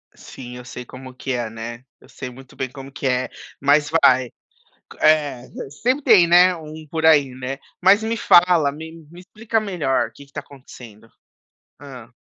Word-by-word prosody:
Sim, 125 Hz, -1 st, -11 dB
eu 125 Hz, -, -11 dB
sei 125 Hz, 0 st, -9 dB
como 130 Hz, +1 st, -11 dB
que 130 Hz, +1 st, -6 dB
é, 120 Hz, -2 st, -3 dB
né. 115 Hz, +2 st, -8 dB
Eu -, -, -20 dB
sei 130 Hz, 0 st, -8 dB
muito 130 Hz, +1 st, -15 dB
bem 130 Hz, -, -4 dB
como 135 Hz, -1 st, -11 dB
que 135 Hz, -, -4 dB
é, 125 Hz, 0 st, 0 dB, 0.3 s
mas 145 Hz, +1 st, +3 dB
vai. 130 Hz, -6 st, +3 dB, 0.6 s
Q -, -, -15 dB
é, 150 Hz, -5 st, +2 dB, 0.4 s
sempre 255 Hz, +5 st, +1 dB
tem, 205 Hz, -8 st, +6 dB
né, 180 Hz, +1 st, +5 dB
um 155 Hz, -1 st, -10 dB
por 160 Hz, +1 st, -4 dB
aí, 145 Hz, -4 st, +5 dB
né. 130 Hz, +1 st, -6 dB, 0.2 s
Mas 200 Hz, +4 st, +5 dB
me 225 Hz, +1 st, -2 dB
fala, 175 Hz, -7 st, +4 dB
me 160 Hz, +2 st, -9 dB, 0.2 s
me 175 Hz, +1 st, -13 dB
explica 220 Hz, +4 st, -3 dB
melhor 180 Hz, -10 st, -1 dB
o -, -, -24 dB
que 140 Hz, -, -14 dB
que 140 Hz, -, -24 dB
está -, -, -6 dB
acontecendo. 120 Hz, -5 st, -15 dB, 0.7 s
Hã. 130 Hz, -4 st, -12 dB
140 Hz, 185 wpm, -21 LUFS, 130-170 Hz, 0.7 s, tem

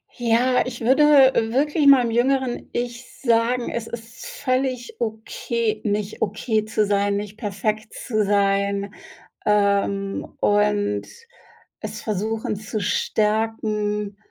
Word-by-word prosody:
Ja, 245 Hz, +1 st, +2 dB
ich 240 Hz, -2 st, -6 dB
würde 260 Hz, +6 st, +4 dB, 0.5 s
wirklich 295 Hz, +4 st, +1 dB
meinem 255 Hz, -4 st, +6 dB
jüngeren 255 Hz, +1 st, 0 dB
Ich 240 Hz, +1 st, -4 dB, 0.2 s
sagen: 235 Hz, 0 st, +1 dB
„Es 230 Hz, -1 st, -4 dB
ist 230 Hz, +1 st, -9 dB
völlig 255 Hz, -2 st, -2 dB
okay, 220 Hz, 0 st, -2 dB
nicht 210 Hz, 0 st, -2 dB
okay 215 Hz, +1 st, 0 dB
zu 215 Hz, -1 st, 0 dB
sein, 200 Hz, 0 st, +1 dB
nicht 205 Hz, +1 st, -6 dB
perfekt 215 Hz, +1 st, -3 dB
zu 215 Hz, -4 st, -1 dB
sein“, 200 Hz, 0 st, +1 dB, 0.5 s
ähm, 200 Hz, -1 st, +1 dB
und 205 Hz, 0 st, +1 dB, 0.8 s
es -, -, -6 dB
versuchen 215 Hz, +1 st, -2 dB
zu 215 Hz, +1 st, -5 dB
stärken 210 Hz, 0 st, -1 dB
220 Hz, 110 wpm, -22 LUFS, 205-240 Hz, 0.8 s, meinem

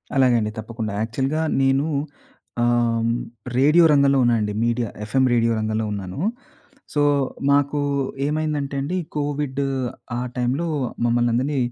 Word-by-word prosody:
అలాగే 130 Hz, -2 st, +4 dB
అండి 105 Hz, 0 st, -2 dB
తప్పకుండా. 110 Hz, -1 st, -5 dB
యాక్చువల్‌గా 135 Hz, +7 st, -1 dB, 0.2 s
నేను 135 Hz, +2 st, +2 dB, 0.7 s
ఆహ్, 120 Hz, -1 st, +2 dB, 0.5 s
రేడియో 150 Hz, +6 st, +5 dB
రంగంలో 140 Hz, -1 st, +4 dB
ఉన్నానండి, 110 Hz, -4 st, +1 dB
మీడియా 120 Hz, -1 st, 0 dB
ఎఫ్ఎం 130 Hz, +5 st, +1 dB
రేడియో 115 Hz, -1 st, +3 dB
రంగంలో 110 Hz, 0 st, -1 dB
ఉన్నాను. 95 Hz, +1 st, -5 dB, 0.7 s
సో, 145 Hz, -, +1 dB, 0.5 s
మాకు 145 Hz, +1 st, +2 dB, 0.5 s
ఏమైందంటే 150 Hz, -2 st, -2 dB
అండి 165 Hz, +7 st, -2 dB, 0.2 s
కోవిడ్ 145 Hz, -2 st, -2 dB, 0.6 s
ఆ -, -, -1 dB, 0.2 s
టైంలో 130 Hz, +7 st, 0 dB, 0.4 s
మమ్మల్నందరిని 120 Hz, +4 st, +1 dB
130 Hz, 115 wpm, -22 LUFS, 115-145 Hz, 0.7 s, రేడియో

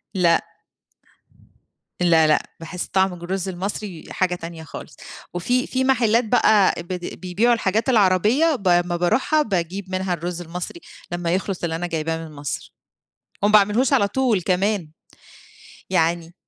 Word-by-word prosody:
لأ. 170 Hz, -3 st, +3 dB, 1.6 s
لا، 165 Hz, -3 st, +4 dB
لأ، 155 Hz, -, +3 dB, 0.2 s
باحس 175 Hz, +2 st, -5 dB
طَعم 190 Hz, -1 st, +1 dB
الرز 185 Hz, +2 st, -4 dB
المصري 190 Hz, -1 st, -5 dB
حاجة 180 Hz, -1 st, 0 dB
تانية 165 Hz, -1 st, -8 dB
خالص. 160 Hz, -, -10 dB, 0.4 s
وفيه 245 Hz, +9 st, 0 dB
فيه 260 Hz, 0 st, -1 dB
محلّات 240 Hz, -3 st, +3 dB
بقى 215 Hz, -3 st, +4 dB
ب -, -, -20 dB, 0.3 s
بيبيعوا 200 Hz, +7 st, +2 dB
الحاجات 220 Hz, +1 st, 0 dB
العربية، 225 Hz, -, +3 dB
ب 200 Hz, -7 st, -4 dB
أمّا 175 Hz, 0 st, +3 dB
بارُوحها 255 Hz, -, +2 dB
باجيب 190 Hz, -, -2 dB
منها 185 Hz, -1 st, -1 dB
الرز 175 Hz, +1 st, -4 dB
المصري 175 Hz, -, -6 dB, 0.3 s
لمّا 175 Hz, -1 st, -2 dB
يخلَص 190 Hz, -1 st, -2 dB
اللي 165 Hz, -1 st, -1 dB
أنا 175 Hz, +2 st, -3 dB
جايباه 165 Hz, -1 st, -2 dB
من 155 Hz, -, -13 dB
مصر. 145 Hz, -1 st, -5 dB, 0.7 s
وما 210 Hz, +1 st, +3 dB
باعملهوش 215 Hz, +6 st, +4 dB
على 220 Hz, -7 st, +4 dB
طول 240 Hz, -2 st, +1 dB
كمان، 190 Hz, -2 st, 0 dB, 1.0 s
يعني 170 Hz, -1 st, 0 dB
185 Hz, 140 wpm, -22 LUFS, 175-215 Hz, 1.6 s, لا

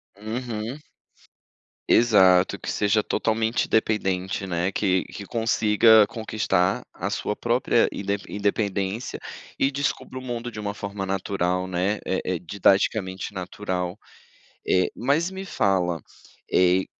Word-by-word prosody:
Uhum. 110 Hz, +3 st, -4 dB, 1.1 s
Exato, 95 Hz, -5 st, +5 dB
que -, -, -6 dB
seja 105 Hz, +1 st, +2 dB
totalmente 110 Hz, +2 st, 0 dB
dependente, 95 Hz, -4 st, 0 dB
né, 90 Hz, +1 st, -1 dB
que 95 Hz, -3 st, +1 dB
que 100 Hz, -, -9 dB
consiga 110 Hz, -1 st, +4 dB
conquistar, 105 Hz, -5 st, 0 dB
a -, -, -3 dB
sua -, -, -2 dB
própria -, -, +2 dB
indepen 100 Hz, +1 st, -4 dB
independência, 100 Hz, +1 st, -1 dB, 0.4 s
e 135 Hz, -, +2 dB
descubra 140 Hz, -2 st, -3 dB
o -, -, -10 dB
mundo 120 Hz, -1 st, -5 dB
de 105 Hz, -, -8 dB
uma 100 Hz, -1 st, -3 dB
forma 100 Hz, -1 st, -5 dB
natural, 95 Hz, -1 st, -1 dB
né, 95 Hz, +3 st, -1 dB
eh 95 Hz, -, 0 dB
eh, 90 Hz, -2 st, -1 dB
didaticamente 95 Hz, +1 st, +1 dB
natural, 90 Hz, -1 st, -4 dB, 0.7 s
eh, 90 Hz, 0 st, +3 dB
mas 150 Hz, +8 st, +1 dB
me 190 Hz, 0 st, -6 dB
fala, 90 Hz, -, 0 dB, 0.5 s
eh, 90 Hz, +1 st, +4 dB
100 Hz, 120 wpm, -24 LUFS, 95-110 Hz, 1.1 s, Exato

